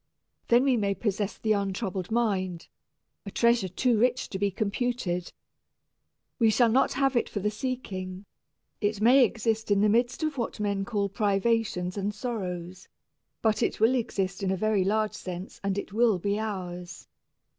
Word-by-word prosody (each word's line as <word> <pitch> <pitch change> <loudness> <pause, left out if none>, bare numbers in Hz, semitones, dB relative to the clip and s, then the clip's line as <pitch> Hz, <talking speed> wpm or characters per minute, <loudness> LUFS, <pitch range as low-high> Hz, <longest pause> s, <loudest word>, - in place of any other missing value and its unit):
Then 240 +2 +5
we 265 -3 +3
may 200 -2 0
possess 205 0 -2
the 220 - -1
untroubled 195 -2 -1
mind, 190 -7 -1 0.5
a 200 - -7
treasure 235 -1 +2
too 225 +5 +1
rich 250 +2 +1
to 190 - -4
be 200 0 +2
computed. 200 -3 -2 1.1
We 225 -2 +5
shall 235 +2 +4
not 260 +4 +3
have 270 0 +1
it 240 - +1
for 205 - -3
the 210 +2 0
seeking; 200 -6 -5 0.6
it 205 0 0
may 250 +5 +6
exist 225 -2 0
in 200 -1 +3
the 210 - +4
midst 240 +7 +1
of 305 -4 -1
what 230 - -3
men 200 -1 0
may 195 - -2
call 205 -2 0
privations 200 -2 0
and 200 +1 -2
sorrows; 185 -6 -5 0.6
but 220 -2 +2
it - - 0
will 225 +4 +4
exist 195 -6 -1
in 195 - 0
a 190 - 0
very 215 -1 +2
large 215 +2 +1
sense 180 +1 -7
and 195 0 -1
it 200 - -5
will 225 -2 +3
be 200 +4 -1
ours. 180 -4 -5
210 Hz, 170 wpm, -27 LUFS, 190-235 Hz, 1.1 s, may